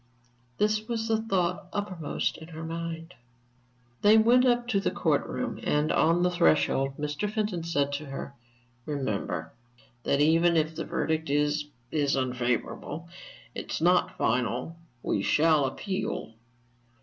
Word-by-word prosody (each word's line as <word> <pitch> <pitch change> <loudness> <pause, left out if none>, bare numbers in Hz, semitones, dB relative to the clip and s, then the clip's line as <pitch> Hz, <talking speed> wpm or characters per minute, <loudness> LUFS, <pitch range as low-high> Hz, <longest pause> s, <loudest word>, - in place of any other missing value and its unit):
This 215 +1 +1
was 225 -2 -2
the 220 -1 +1
thought 185 -3 -1
uppermost 185 -7 -2
in 160 - -10
her 160 -1 -8
mind. 165 0 -5 0.9
They 210 +2 +7
went 245 +3 +5
up 240 -1 +2
to 200 - +2
the - - 0
court - - 0
room, - - -3
and 150 +1 +1
on 170 +2 +3
the 180 - +3
threshold 140 -5 +2
Mr. 150 +7 -2
Fenton 210 -6 -1
said 145 -4 0
to 145 +1 -4
her: 135 0 -6 0.5
"Remember, 100 - -2 0.5
that 140 - +1
even 165 +3 +4
if 155 0 +1
the 165 +1 -4
verdict 160 -1 -1
is 150 +1 +1 0.2
is 145 -3 +1
unfavorable, 130 +5 -2 0.4
it - - -6
is - - -1
not 180 +2 +3
final. 125 +6 0 0.3
We 100 - 0
shall 155 +5 +3
appeal." 185 - -3
160 Hz, 140 wpm, -28 LUFS, 145-190 Hz, 0.9 s, They